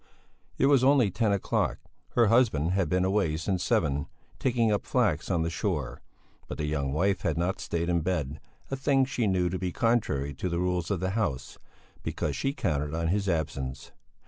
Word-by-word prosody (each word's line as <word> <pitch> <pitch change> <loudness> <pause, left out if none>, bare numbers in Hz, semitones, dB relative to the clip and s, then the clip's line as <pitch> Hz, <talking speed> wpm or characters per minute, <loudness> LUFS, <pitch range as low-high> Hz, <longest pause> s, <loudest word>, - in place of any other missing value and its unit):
It - - +3
was 140 -2 +5
only 130 -6 +4
ten 110 +3 +1
o'clock. 100 -1 0 0.4
Her 120 - +5
husband 105 - +3
had 95 -4 +1
been 90 +2 +2
away 95 -5 +1
since 90 +2 -1
seven, 70 +1 +1 0.3
taking 120 -3 +2
up 105 - 0
flax - - +1
on 80 - +1
the 85 - -1
shore. 75 - -2 0.5
But - - -6
the 75 - -2
young 70 -3 -1
wife 95 +7 +1
had - - -1
not 90 +3 -1
stayed 85 0 -2
in 85 -1 +1
bed 75 -4 -2 0.3
a - - 0
thing 135 0 +2
she 125 -4 -1
knew 90 -2 +2
to 90 +1 -2
be 90 -2 -2
contrary 85 - 0
to 80 +7 -3
the 85 - -1
rules 90 -1 -1
of 95 -4 -1
the 95 0 0
house 100 - -2 0.4
because - - -2
she 135 - 0
counted 75 - -2
on 80 0 -1
his 100 +1 0
absence. 70 -5 -3
90 Hz, 195 wpm, -28 LUFS, 80-105 Hz, 0.5 s, was